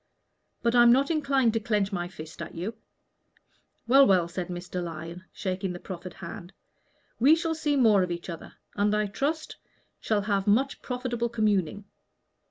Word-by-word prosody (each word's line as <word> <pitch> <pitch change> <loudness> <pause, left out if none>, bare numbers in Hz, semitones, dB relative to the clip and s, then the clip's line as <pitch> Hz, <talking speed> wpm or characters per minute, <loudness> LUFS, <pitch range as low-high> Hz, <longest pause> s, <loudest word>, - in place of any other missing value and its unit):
"But 235 -1 +2
I'm 240 -1 +7
not 275 +5 +3
inclined 275 -7 +2
to 225 - +1
clench 210 -2 0
my 175 -2 -2
fist 160 -3 -10
at 170 - -7
you." 185 +7 -4 1.1
"Well, 270 +3 +7
well," 180 -3 +4
said 175 0 -4
Mr. 180 0 -5
Lyon, 165 +2 -7
shaking 190 -1 -3
the 175 - -7
proffered 180 -1 -8
hand, 175 +1 -9 0.7
"we 280 +7 +6
shall 330 0 -1
see 300 -2 0
more 220 -7 +5
of 180 - 0
each 170 0 -5
other, 170 -3 -8 0.2
and 205 +1 +1
I 210 0 +1
trust 290 +10 -3 0.4
shall 215 -2 0
have 200 -1 -1
much 260 +7 +2
profitable 245 -2 -2
communing. 205 -4 0
205 Hz, 165 wpm, -27 LUFS, 180-245 Hz, 1.1 s, I'm